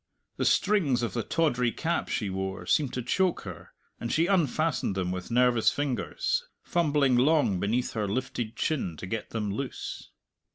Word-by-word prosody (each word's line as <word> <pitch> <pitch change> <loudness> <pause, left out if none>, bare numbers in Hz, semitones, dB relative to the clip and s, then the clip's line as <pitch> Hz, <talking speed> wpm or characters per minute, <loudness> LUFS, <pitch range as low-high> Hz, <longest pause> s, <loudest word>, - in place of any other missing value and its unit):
The - - 0
strings 160 -12 +3
of 115 - -2
the 120 - 0
tawdry 125 -5 +1
cap 170 +6 -1
she 105 - -1
wore 95 -1 -4
seemed 140 +7 +2
to 125 - -3
choke 185 +7 +1
her, - - -9 0.3
and 115 - -3
she 165 - +3
unfastened 160 - +1
them 90 -2 -1
with 90 0 -5
nervous 120 -1 +4
fingers, 145 - -1 0.2
fumbling 145 -6 +2
long 130 - +3
beneath 115 +6 0
her 105 -2 -1
lifted 120 +1 -3
chin 120 - -1
to - - -6
get 110 +3 -4
them 105 -3 -2
loose. 130 +6 -5
125 Hz, 165 wpm, -28 LUFS, 105-155 Hz, 0.3 s, nervous